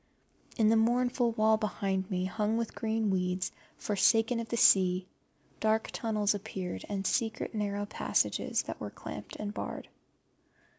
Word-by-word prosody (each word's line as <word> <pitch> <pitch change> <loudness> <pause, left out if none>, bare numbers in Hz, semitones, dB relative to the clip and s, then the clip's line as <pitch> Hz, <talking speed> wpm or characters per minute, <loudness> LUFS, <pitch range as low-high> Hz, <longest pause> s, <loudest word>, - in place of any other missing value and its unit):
In 220 -3 +4
the 225 - +5
mournful 240 +1 +2
wall 220 0 +4
behind 195 -3 -2
me, 185 -2 -1
hung 210 +3 0
with 230 -1 -2
green 220 -2 0
weeds, 180 0 -1 0.3
forsaken 225 +3 +2
of 230 -1 -5
the 235 - -1
sea, 185 -3 +5 0.5
dark 220 0 +1
tunnels 215 -3 0
appeared, 190 - -5
and 195 -1 -3
secret 225 +3 -1
narrow 205 -1 -2
passages 205 - 0
that - - -7
were - - -4
clamped - - -8
and 210 -1 -5
barred. - - -6
215 Hz, 145 wpm, -31 LUFS, 195-225 Hz, 0.5 s, the